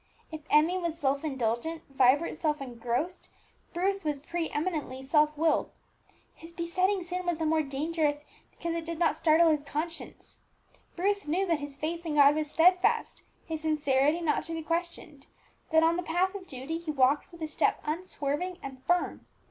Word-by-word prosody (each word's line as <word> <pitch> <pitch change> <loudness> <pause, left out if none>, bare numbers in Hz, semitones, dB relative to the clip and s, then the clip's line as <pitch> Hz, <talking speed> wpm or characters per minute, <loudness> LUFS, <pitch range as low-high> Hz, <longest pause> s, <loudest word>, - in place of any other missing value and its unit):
If 315 -1 -6
Emmie 320 +5 +4
was 340 -2 -3
self 280 -1 0
indulgent, 265 +3 -2
Vibert 265 +6 +4
self 300 -2 -1
engrossed, 250 +6 -3 0.4
Bruce 390 +3 -1
was 300 -2 -1
pre 330 +4 -3
eminently 295 -5 -3
self 300 +2 +2
willed. 320 +1 +2 0.6
His 330 +1 -13
besetting 365 +3 0
sin 360 +1 -4
was 350 -2 -1
the 320 - -2
more 315 0 +3
dangerous 295 +1 -1 0.2
because 335 -1 -4
it 335 0 -3
did 335 0 -5
not 330 -2 +2
startle 325 +1 +4
his 300 -2 +1
conscience. 310 +4 -6 0.6
Bruce 400 0 0
knew 360 +6 +1
that 335 -4 +1
his 285 -1 -6
faith 335 +3 -3
in 320 -3 -3
God 285 0 +7
was 305 0 -2
steadfast, 360 +4 +3 0.2
his 320 -2 -4
sincerity 300 0 +2
not 310 -3 +1
to 330 - -5
be 325 -1 -4
questioned, 330 -3 -4 0.4
that 320 0 +4
on 330 +1 +3
the - - -1
path 360 +3 0
of 385 -2 -8
duty 270 +6 -5
he 335 -2 -8
walked 280 +2 +2
with 335 -2 -9
a - - -1
step 305 - +1
unswerving 325 +1 -3
and 265 -1 -8
firm. 355 0 0
320 Hz, 175 wpm, -29 LUFS, 290-340 Hz, 0.6 s, God